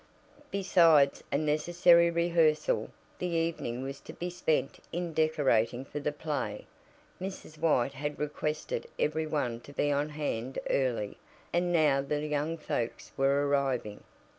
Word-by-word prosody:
Besides 165 -7 +4
a 140 - +2
necessary 170 +3 +4
rehearsal, 170 -2 +2 0.3
the 180 - -1
evening 165 -8 -1
was 135 +1 -5
to - - -11
be 175 +1 -4
spent 160 -5 0
in 175 -1 -3
decorating 135 -6 +2
for 145 - -5
the 145 +1 -1
play. 145 -9 -4 0.6
Mrs. 185 -5 -7
White 140 -5 +2
had 145 +2 -4
requested 150 +1 -3
every 155 +1 0
one 130 -7 -1
to 130 - -13
be 145 +1 0
on 145 +1 0
hand 135 -4 -3
early, 120 -6 0 0.3
and 175 0 +1
now 150 -5 +4
the 145 +2 -2
young 150 +2 -1
folks 120 -6 -3
were 140 +1 +2
arriving. 135 -7 -1
150 Hz, 140 wpm, -30 LUFS, 135-165 Hz, 0.6 s, Besides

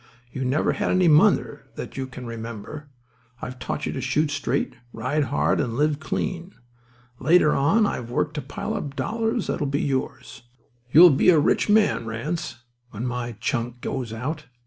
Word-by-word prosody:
You 130 - -4
never 130 +4 +1
had - - -1
any 185 -1 +3
mother 150 -1 +3
that - - -7
you 135 -1 -3
can 130 -1 -9
remember. 115 +5 -7 0.5
I've 125 0 -7
taught 125 - -3
you - - -2
to 130 - -4
shoot 145 +4 0
straight, 140 -2 -1 0.2
ride 130 +6 -1
hard, 140 - +1
and 115 -2 -3
live 150 +2 +1
clean. 175 +3 -4 0.6
Later 150 +2 +4
on 180 +11 +3
I've 120 - -3
worked 150 +5 -1
to 150 - -3
pile 145 - -5
up 150 -10 -4
dollars 225 - -1
that'll 145 - -2
be 140 +1 -1
yours. 130 -3 -3 0.5
You'll 170 +3 +9
be 135 +6 +4
a 170 - +6
rich 150 +7 +2
man, 205 - +3
Ranse, 130 +3 -4 0.3
when 110 +2 -5
my 120 -1 -3
chunk 120 0 -2
goes 130 -4 -4
out. 140 +8 -4
140 Hz, 170 wpm, -24 LUFS, 125-155 Hz, 0.6 s, You'll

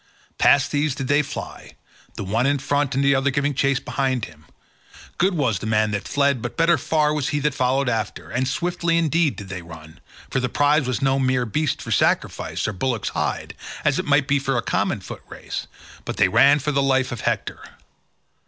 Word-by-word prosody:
Past 140 -1 +4
these 145 -1 0
did 135 -3 -5
they 145 +1 +4
fly, 140 - -8 0.4
the - - -5
one 115 +7 0
in 145 +1 +2
front 145 0 -1
and 135 - +1
the 140 - +5
other 135 +1 +2
giving 140 +1 0
chase 135 -1 +1
behind 130 -3 -1
him: 80 -3 -16 0.7
good 185 +1 +2
was 120 - 0
the 110 - -5
man 110 -1 +2
that 100 -1 -3
fled, 140 -3 +1
but 120 - -6
better 170 +1 +4
far 150 +1 +1
was 145 -3 -1
he 145 - -1
that 150 0 +1
followed 130 +1 +1
after, 115 -2 -2
and 125 +2 0
swiftly 170 +3 0
indeed 165 -2 +2
did 100 -2 -9
they 95 -1 -5
run, 80 -2 -13 0.3
for 135 - +1
the 125 -1 -1
prize 145 -1 +2
was 130 0 -2
no 135 0 +2
mere 130 -1 +1
beast 150 +5 -1
for - - -6
sacrifice - - 0
or 105 - -2
bullock's 115 +2 -2
hide, - - -3 0.3
as - - +2
it - - -2
might 145 -1 +3
be 145 0 +2
for 135 -2 -1
a 120 - -1
common - - -1
foot - - -9
race, - - -6 0.4
but - - -5
they - - +5
ran 140 +1 +5
for 150 +1 -2
the 140 -1 +1
life 130 -1 +1
of 120 -3 -5
Hector. - - -2
135 Hz, 210 wpm, -22 LUFS, 125-145 Hz, 0.7 s, the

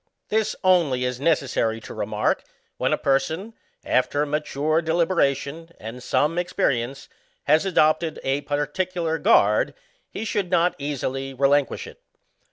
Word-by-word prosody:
'ITiis 220 0 +1
only 165 -9 +3
is 125 -1 -3
necessary 135 -7 +1
to - - -10
remark, - - -1 0.3
when - - 0
a - - +2
per 135 -1 +3
son, 165 +11 -6 0.3
after 145 +3 +1
mature 150 +1 0
deliberation 165 -2 0
and 115 +3 -8
some 150 +6 +1
experience, 135 -6 -1 0.4
has 155 +6 +3
adopted 155 -2 +2
a 135 +2 0
particular 160 +3 -2
guard, 105 -5 +3 0.3
he 220 - -5
should 205 -4 -1
not 175 0 +3
easily 135 -1 -3
relinquish 140 +1 +2
it. - - -13
150 Hz, 130 wpm, -24 LUFS, 135-170 Hz, 0.4 s, only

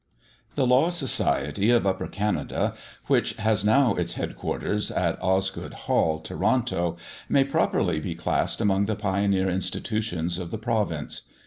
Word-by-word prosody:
The 135 - +2
Law 130 +6 +4
Society 105 - 0
of 120 -3 +4
Upper 95 -1 0
Canada, 105 0 -1 0.3
which - - +2
has 110 -2 +1
now 115 +2 +4
its 85 -2 -2
headquarters 105 0 -2
at - - -1
Osgoode 95 0 -1
Hall, 80 -1 +2
Toronto, 90 -1 0 0.3
may 135 - +4
properly 135 - +1
be 85 +2 -4
classed 85 - -1
among 100 -2 +2
the 110 - 0
pioneer 100 -1 +1
institutions 95 -2 -1
of 90 -2 -5
the 110 - -4
province. 105 - -2
100 Hz, 135 wpm, -26 LUFS, 90-115 Hz, 0.3 s, Law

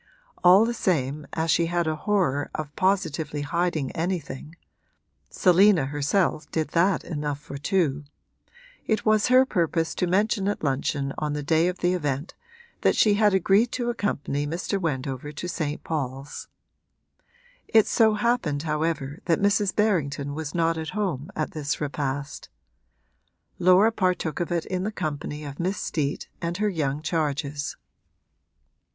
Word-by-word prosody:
All 185 +5 +7
the 235 - -1
same, 150 - -1
as 160 0 0
she 170 - +3
had 175 0 0
a 155 0 0
horror 170 -7 0
of 150 -2 -5
positively 160 -6 0
hiding 160 -2 -1
anything 165 -3 -4 0.7
(Selina 185 -3 +4
herself 145 +3 0
did 155 -2 -1
that 175 +3 +2
enough 150 -3 -3
for 140 -1 -8
two) 150 -4 0 0.8
it 220 - 0
was 215 -1 +3
her 255 +1 +6
purpose 165 -6 0
to 180 - -1
mention 200 +2 +1
at 205 - -2
luncheon 140 0 -1
on 150 -1 -2
the 150 0 -3
day 160 +3 +3
of 180 0 -3
the 180 +1 +2
event 145 -3 -2 0.5
that - - +3
she 210 - +4
had 205 -1 +3
agreed 200 +5 +3
to 240 -1 -1
accompany 145 -9 -2
Mr. 180 +5 -2
Wendover 135 -3 -3
to 165 +4 -5
St. 155 -4 -3
Paul's. 135 -2 -4 1.2
It 220 -2 +5
so 220 -2 +3
happened 210 -10 0
however 150 -2 -2
that 165 -2 +3
Mrs. 200 -1 +2
Berrington 150 -9 0
was 155 +1 -5
not 165 -1 +1
at 160 - -4
home 175 -7 -2
at 155 - -2
this 150 -2 -3
repast; 140 -1 -4 1.1
Laura 185 +5 +5
partook 180 -7 -1
of 175 0 -2
it 170 -2 0
in 185 -1 -2
the 205 +3 -2
company 150 -4 -4
of 140 -1 -8
Miss 185 +4 -1
Steet 145 -3 -2
and 170 +1 -2
her 210 +1 +1
young 150 -5 -2
charges. 150 -3 -2
165 Hz, 150 wpm, -25 LUFS, 145-190 Hz, 1.2 s, All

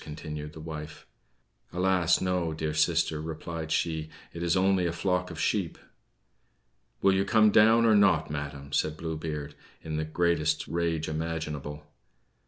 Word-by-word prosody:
continued 75 0 -7
the 80 - -10
wife. 75 -1 -8 0.7
"Alas, 90 -1 +2
no, 90 -3 0
dear 80 -1 -2
sister," 80 0 +1
replied 80 0 -5
she, 80 -1 -1 0.2
"it 85 - -6
is 85 +1 +2
only 95 -1 +3
a - - -1
flock 90 +1 -1
of - - -8
sheep!" - - 0 1.3
"Will 95 - +5
you 95 0 +2
come 110 +1 +4
down 115 +2 +6
or 110 - +5
not, 95 -7 +4
madam?" 70 -1 -6
said 75 0 0
Blue 80 0 -4
Beard, 75 -2 -5 0.3
in 80 -1 -4
the 80 - 0
greatest 80 0 0
rage 85 -2 -1
imaginable. 75 -2 -4
80 Hz, 150 wpm, -28 LUFS, 75-90 Hz, 1.3 s, down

